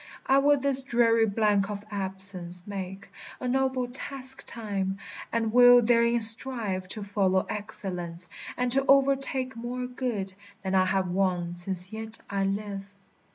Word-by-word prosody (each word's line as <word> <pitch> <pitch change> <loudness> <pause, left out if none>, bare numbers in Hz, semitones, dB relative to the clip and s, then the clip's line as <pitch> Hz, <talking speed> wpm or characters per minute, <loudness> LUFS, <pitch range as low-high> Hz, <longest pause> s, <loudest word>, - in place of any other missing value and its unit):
I 270 +1 +3
will 290 +1 +3
this 270 0 +1
dreary 230 -3 +2
blank 205 -1 0
of 205 0 -7
absence 190 -3 -2
make 195 -1 -8 0.3
A 255 - -5
noble 260 0 -1
task 265 +1 -7
time; 195 -4 -4 0.3
and 225 -1 -2
will 245 0 +7
therein 235 0 +2
strive 220 -5 +6
To 210 +2 -7
follow 195 -2 0
excellence, 180 -4 -6 0.3
and 250 0 -1
to 270 +2 +1
o'ertake 270 -2 +1
More 245 +2 -5
good 245 -6 -5 0.3
than 190 0 -3
I 185 -1 +3
have 190 0 -1
won 180 -2 -1
since 180 +2 +2
yet 220 0 -8
I 195 -1 -1
live. 200 0 -4
215 Hz, 145 wpm, -26 LUFS, 190-250 Hz, 0.3 s, will